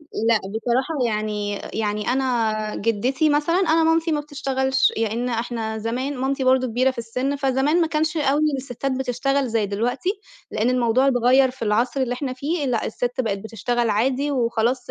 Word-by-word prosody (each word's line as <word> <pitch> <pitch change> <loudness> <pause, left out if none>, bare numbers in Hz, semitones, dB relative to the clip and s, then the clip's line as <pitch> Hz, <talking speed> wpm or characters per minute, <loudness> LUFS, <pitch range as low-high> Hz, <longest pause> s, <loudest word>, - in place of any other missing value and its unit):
لأ، 230 -7 0
بصراحة 235 +9 -2
يعني 210 -1 -2 0.2
يعني 210 -1 -2
أنا 230 -5 0
جِدّتي 250 +8 +1
مثلًا 295 +3 +1
أنا 325 -3 +3
مامتي 325 0 +2
ما 295 - +1
بتشتغلش 265 -2 0
لإن 225 +2 -1
إحنا 225 -2 -3
زمان 255 +5 -3
مامتي 265 +1 -1
برضه 255 0 +3
كبيرة 250 +3 +2
في 260 - -10
السِن 255 +5 -2
فزمان 275 +4 +1
ما 330 - +3
كانش 315 0 -1
أوي 290 0 +2
إن 305 -3 +1
السِتّات 265 +1 -4
بتشتغل 265 +1 0
زي 220 -2 0
دلوقتي 240 - -2 0.4
لإن 230 +4 0
الموضوع 250 +2 +2
اتغيّر 255 +1 +4
في 255 -1 -13
العصر 235 +5 +1
اللي 245 -2 0
إحنا 260 0 -3
فيه 285 +3 -2
لأ، 235 -3 0
السِت 245 +3 -2
بقت 205 -5 -1
بتشتغل 230 +2 -1
عادي 260 +7 +1
وخلاص 245 -1 0
255 Hz, 170 wpm, -22 LUFS, 225-275 Hz, 0.4 s, اتغيّر